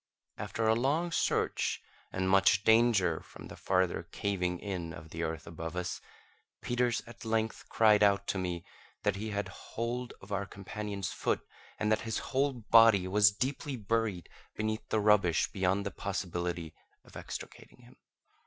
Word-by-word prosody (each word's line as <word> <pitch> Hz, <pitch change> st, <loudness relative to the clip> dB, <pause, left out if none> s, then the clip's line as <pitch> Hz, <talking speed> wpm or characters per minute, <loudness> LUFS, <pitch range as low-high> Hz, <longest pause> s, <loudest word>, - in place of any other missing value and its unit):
After 115 Hz, -1 st, -2 dB
a 110 Hz, -, +5 dB
long 145 Hz, +9 st, +1 dB
search, -, -, 0 dB, 0.3 s
and 95 Hz, 0 st, -1 dB
much 95 Hz, +1 st, +4 dB
danger 110 Hz, -8 st, +4 dB
from -, -, -12 dB
the -, -, -9 dB
farther 95 Hz, -1 st, +1 dB
caving 90 Hz, -3 st, -1 dB
in 90 Hz, -4 st, -4 dB
of 80 Hz, +1 st, -11 dB
the 85 Hz, -, -5 dB
earth 80 Hz, -3 st, -3 dB
above 80 Hz, +1 st, -6 dB
us, 90 Hz, 0 st, -3 dB, 0.6 s
Peters 120 Hz, -1 st, 0 dB
at 115 Hz, -4 st, -12 dB
length 110 Hz, 0 st, -1 dB
cried 105 Hz, -2 st, +5 dB
out 100 Hz, -1 st, +4 dB
to 95 Hz, -, 0 dB
me 90 Hz, -2 st, -3 dB, 0.4 s
that 105 Hz, -2 st, +1 dB
he 110 Hz, +2 st, -4 dB
had 100 Hz, 0 st, -2 dB
hold 120 Hz, +2 st, -4 dB
of 95 Hz, -, -14 dB
our 100 Hz, 0 st, -1 dB
companion's 100 Hz, 0 st, -5 dB
foot, -, -, -1 dB, 0.4 s
and 105 Hz, 0 st, 0 dB
that 110 Hz, -, +2 dB
his 110 Hz, -2 st, -2 dB, 0.2 s
whole 140 Hz, +1 st, +2 dB
body 115 Hz, -4 st, +5 dB
was 105 Hz, +2 st, +6 dB
deeply 135 Hz, +5 st, -2 dB
buried 110 Hz, -4 st, -1 dB, 0.3 s
beneath 110 Hz, +1 st, -3 dB
the 110 Hz, -, +2 dB
rubbish 100 Hz, -5 st, +3 dB
beyond 95 Hz, +1 st, 0 dB
the 100 Hz, -, -2 dB
possibility 85 Hz, -4 st, -3 dB, 0.3 s
of -, -, -18 dB
extricating -, -, -8 dB
him. -, -, -17 dB
100 Hz, 160 wpm, -31 LUFS, 90-115 Hz, 0.6 s, was